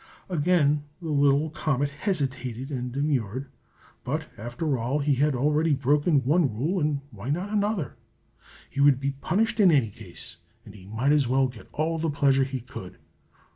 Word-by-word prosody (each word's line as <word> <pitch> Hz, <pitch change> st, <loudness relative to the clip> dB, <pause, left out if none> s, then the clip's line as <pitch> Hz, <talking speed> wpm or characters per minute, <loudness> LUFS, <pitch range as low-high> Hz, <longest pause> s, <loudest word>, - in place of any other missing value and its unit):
Again 150 Hz, -3 st, +2 dB
the 165 Hz, -3 st, -6 dB
little 145 Hz, +1 st, +3 dB
comet 145 Hz, -2 st, 0 dB
hesitated 135 Hz, -, -2 dB
and 125 Hz, -2 st, -3 dB
demurred; 135 Hz, -2 st, -1 dB, 0.5 s
but -, -, -3 dB
after 125 Hz, +7 st, -2 dB
all, 125 Hz, +5 st, 0 dB
he 145 Hz, -1 st, +2 dB
had 145 Hz, +1 st, +2 dB
already 150 Hz, +4 st, +2 dB
broken 145 Hz, +2 st, +2 dB
one 150 Hz, 0 st, +3 dB
rule, 165 Hz, -, 0 dB
and 150 Hz, -3 st, 0 dB
why 110 Hz, +2 st, -7 dB
not 180 Hz, +8 st, -1 dB
another? 205 Hz, -, -1 dB, 0.7 s
He 140 Hz, -, -3 dB
would 140 Hz, -2 st, +5 dB
be 140 Hz, 0 st, -1 dB
punished 210 Hz, +11 st, 0 dB
in 195 Hz, -3 st, +7 dB
any 135 Hz, -9 st, +3 dB
case, 90 Hz, -5 st, -9 dB, 0.3 s
and 105 Hz, -, -12 dB
he 95 Hz, -2 st, -13 dB
might 115 Hz, +7 st, +1 dB
as 145 Hz, -4 st, +3 dB
well 135 Hz, +2 st, +3 dB
get 115 Hz, -6 st, -12 dB
all 160 Hz, +2 st, -1 dB
the 160 Hz, 0 st, 0 dB
pleasure 135 Hz, -2 st, +3 dB
he 130 Hz, -1 st, -4 dB
could. 105 Hz, -6 st, -9 dB
140 Hz, 170 wpm, -26 LUFS, 130-155 Hz, 0.7 s, in